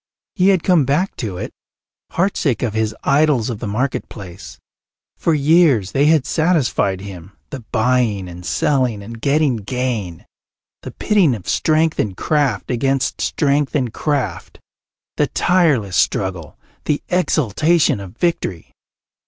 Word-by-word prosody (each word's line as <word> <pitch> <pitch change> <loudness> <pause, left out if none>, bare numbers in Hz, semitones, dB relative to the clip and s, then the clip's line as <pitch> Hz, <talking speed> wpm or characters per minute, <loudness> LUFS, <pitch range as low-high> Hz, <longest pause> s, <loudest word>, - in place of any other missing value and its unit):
He 185 -1 +2
had 190 -4 +3
come 180 -5 +4
back 150 +9 0
to 100 -7 -4
it, - - -5 0.6
heartsick 165 - 0
of 115 -4 -1
his 110 0 -1
idols 140 -4 +2
of 110 - -6
the 115 - -5
marketplace. 100 - -5 0.6
For 165 - +1
years 145 - +3
they 140 +5 +2
had 155 -4 +3
satisfied 155 - +1
him, 95 -2 -10 0.2
the 135 - -5
buying 110 -5 +1
and 90 0 -10
selling 115 - 0
and 115 +2 -10
getting 140 -3 +2
gain, 110 - -4 0.6
the - - -7
pitting 190 - +2
of 100 - -11
strength 155 0 +1
and 100 -4 -1
craft 145 -10 0
against 135 +2 0
strength 145 -1 0
and 125 -6 -1
craft, 140 - -3 0.6
the - - +2
tireless 145 - +1
struggle, 90 -6 -1 0.3
the 150 - -1
exultation 160 - +2
of 100 +3 -10
victory. 95 - -2
125 Hz, 135 wpm, -19 LUFS, 100-155 Hz, 0.6 s, come